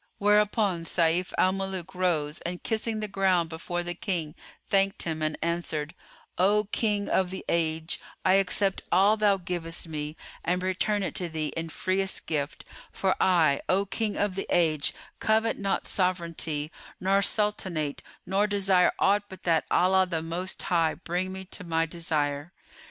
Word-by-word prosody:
Whereupon 205 -3 +2
Sayf 170 +2 +2
al 185 - +4
Muluk 190 -1 -4
rose 165 -5 0
and 175 +1 -5
kissing 220 0 -1
the 215 - -2
ground 190 -4 +2
before 175 +2 -4
the 175 0 -3
King, 170 -4 -2 0.3
thanked 195 0 +2
him 160 -2 -3
and 155 0 -1
answered, 170 -2 -2 0.5
"O 205 +3 +4
King 210 -3 +1
of 185 -1 +1
the 190 - -6
Age, 160 0 0 0.3
I 185 - +5
accept 195 +1 +1
all 200 +4 +5
thou 210 -2 +3
givest 170 -2 -3
me 150 -1 -5 0.3
and 180 +1 0
return 195 +2 0
it - - -2
to 175 - -2
thee 155 -2 -3
in 165 0 -3
freest 190 +3 -1
gift; 145 -3 -2 0.3
for 190 -1 +1
I, 165 -6 +4
O 195 +2 +3
King 205 +2 -2
of 205 -2 +1
the 195 - -4
Age, 155 -4 +2 0.3
covet 220 +1 +2
not 200 -1 0
sovranty 170 -5 -1 0.3
nor 195 +2 +3
sultanate 190 -8 0 0.2
nor 195 +3 +2
desire 195 -3 +3
aught 205 +1 +3
but 190 - -11
that 165 -3 +2
Allah 190 +1 +4
the 165 -3 -2
Most 175 +3 -3
High 165 -3 +2
bring 180 +2 -3
me 190 0 -6
to 185 - -6
my 165 -1 +1
desire." 155 -1 -2
180 Hz, 160 wpm, -27 LUFS, 165-195 Hz, 0.5 s, I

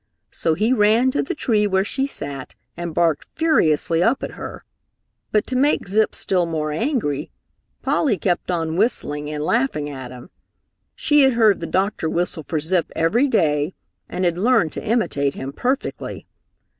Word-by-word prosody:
So 160 - 0
he 220 +7 +2
ran 225 +3 +4
to 285 - 0
the 345 +5 -3
tree 215 -7 +1
where 190 0 +1
she 270 +6 -1
sat 140 - -7 0.2
and 170 -2 -5
barked 165 -4 +2
furiously 165 - +2
up 230 +8 +2
at - - -4
her. - - -8 0.7
But 210 - +2
to 260 - -3
make 275 -4 +2
Zip 215 +3 +2
still 180 -3 +1
more 155 -2 -2
angry, 155 - -1 0.5
Polly 245 -10 +1
kept 175 +1 -1
on 165 -2 -1
whistling 150 -9 0
and 150 0 -3
laughing 155 - 0
at 130 -3 -7
him. 125 +7 -12 0.6
She 295 -2 +3
had 265 -1 +5
heard 220 -4 +4
the 165 - -4
doctor 190 -1 0
whistle 170 -1 -1
for 155 +1 -2
Zip 170 +2 0
every 220 +13 +2
day 155 - +1 0.3
and 185 - -2
had 175 0 0
learned 225 -7 +3
to - - -5
imitate 145 - 0
him 135 +1 -6
perfectly. 260 - -3
180 Hz, 170 wpm, -21 LUFS, 155-235 Hz, 0.7 s, had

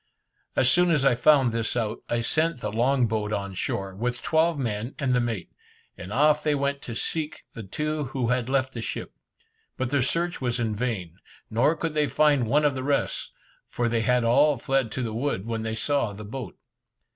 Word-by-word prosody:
As 130 - +3
soon 180 +6 +4
as 150 -5 +2
I 135 - +5
found 135 0 +4
this 115 +1 -1
out, 110 -2 -1
I 120 0 +1
sent 155 +4 +1
the 105 - -3
long 125 +3 +2
boat 105 -1 -2
on 100 -2 -3
shore, 95 +1 -3
with 120 +4 -3
twelve 160 0 +2
men 115 -1 -3
and 130 -3 0
the 125 - +3
mate, 115 -7 -3 0.4
and 90 - -9
off 150 +5 +4
they 150 -1 +2
went 140 0 -1
to 115 - -6
seek 155 +4 -3
the 115 - -7
two 150 +9 -3
who 130 -2 -2
had 125 0 0
left 135 -1 +1
the 115 - -5
ship. - - -5 0.6
But 130 -1 -2
their 140 -2 +2
search 170 +7 0
was 125 -1 -1
in 110 -2 -1
vain, 100 -7 -3 0.3
nor 130 +9 +3
could 165 0 -3
they 150 -1 +2
find 145 -6 +3
one 150 +6 +3
of 145 - +3
the 130 - -4
rest, 140 +1 -1 0.4
for 120 - -1
they 115 -1 +1
had 125 +2 +2
all 140 +5 +4
fled 135 -1 0
to 130 - -2
the 115 -2 -3
woods 115 -4 -2
when 115 -1 -3
they 110 0 -3
saw 115 -1 0
the 105 +1 -8
boat. 115 -3 -7
125 Hz, 210 wpm, -26 LUFS, 115-145 Hz, 0.6 s, I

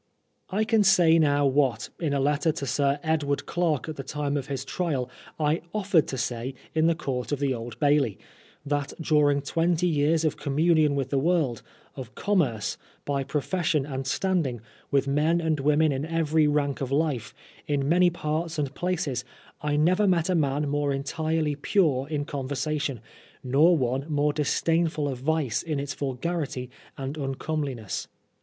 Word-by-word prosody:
I 205 +3 +1
can 220 -1 +3
say 175 -4 +5
now 145 -2 +3
what, 130 -4 +1
in 160 -4 -1
a 140 - +1
letter 145 +3 +2
to 140 - -5
Sir 140 +2 +1
Edward 150 -3 0
Clarke 165 -6 0
at 155 - -6
the 135 - -5
time 145 0 -2
of 140 -2 -2
his 135 -2 -4
trial, 135 -7 -2 0.3
I 155 +2 +1
offered 195 -6 +2
to 130 - -4
say 120 +2 -3 0.2
in 160 0 +3
the 170 - +3
Court 130 -5 -3
of 145 - +1
the 140 -1 0
Old 115 -1 -6
Bailey, 145 - +2 0.5
that 145 -1 -1
during 145 -3 +3
twenty 165 +3 +1
years 160 0 +2
of 155 - 0
com 140 -1 -3
munion 155 -3 +4
with 135 -2 -2
the 140 - +2
world, 150 -7 +1 0.3
of 130 -3 -8
commerce, 140 - 0 0.3
by 140 -1 -1
profession 150 +1 0
and 135 -2 -4
standing, 145 -4 0 0.3
with 140 0 +2
men 150 +5 +2
and 160 -3 0
women 150 +2 +3
in 135 0 -2
every 160 -1 +2
rank 145 -2 0
of 135 -1 -3
life, 135 -8 -1 0.3
in 140 -2 0
many 175 +3 +5
parts 165 0 -3
and 140 -2 -2
places, 165 -9 -2 0.4
I 150 -1 0
never 180 +7 +3
met 180 -1 +2
a - - +2
man 145 -2 +1
more 145 0 0
entirely 155 +2 -1
pure 145 -3 +1
in 145 -2 -2
conversation, 140 -2 -3 0.4
nor 150 +7 +4
one 130 +3 -1
more 145 0 +2
disdainful 160 +1 +1
of 130 -3 -4
vice 145 -3 0
in 155 -4 -3
its 140 0 -3
vulgarity 135 -2 -3 0.3
and 135 +2 -5
uncomeliness. 135 -4 -3
145 Hz, 170 wpm, -26 LUFS, 135-160 Hz, 0.5 s, say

